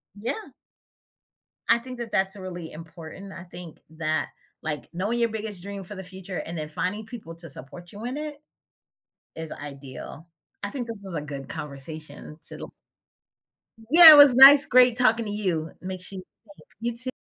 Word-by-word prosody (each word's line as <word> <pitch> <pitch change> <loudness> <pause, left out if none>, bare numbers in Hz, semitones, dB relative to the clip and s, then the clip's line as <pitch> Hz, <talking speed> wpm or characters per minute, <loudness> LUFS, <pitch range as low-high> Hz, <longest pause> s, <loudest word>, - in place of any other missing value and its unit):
Yeah. 240 - -6 1.2
I - - +6
think 250 0 -10
that 230 -2 -6
that's 190 +1 0
really 175 -3 -8
important. 165 +4 -11
I 175 - -10
think 175 -2 -11
that, 155 0 -2 0.3
like, 150 -2 -5
knowing 205 +7 -2
your 235 -1 +2
biggest 210 -4 -6
dream 200 -1 -7
for 205 +3 -5
the 190 - -8
future 185 0 -8
and 165 0 -6
then 155 0 -4
finding 185 +7 -3
people 215 -8 -10
to 165 -1 -7
support 175 +7 -5
you 210 +3 -9
in 255 +4 -4
it 300 -1 -6 1.0
is 160 -1 -6
ideal. 140 +2 -10 0.4
I 200 - -4
think 250 -4 -5
this 220 -4 -8
is 190 - -7
a 150 - -2
good 140 -2 -8
conversation 150 +1 -7
to - - -9
loo - - -8 1.2
Yeah, 325 +2 +11
it - - +8
was 285 -4 +9
nice 280 +2 +9
great 250 -1 +5
talking 230 -2 +2
to 205 - -5
you. 180 -6 -2
Make 185 0 -6
sure 195 +1 -7
you 185 - -8 0.3
safe. - - -22
You 235 0 -3
too. 255 +2 +1
190 Hz, 180 wpm, -25 LUFS, 160-235 Hz, 1.2 s, Yeah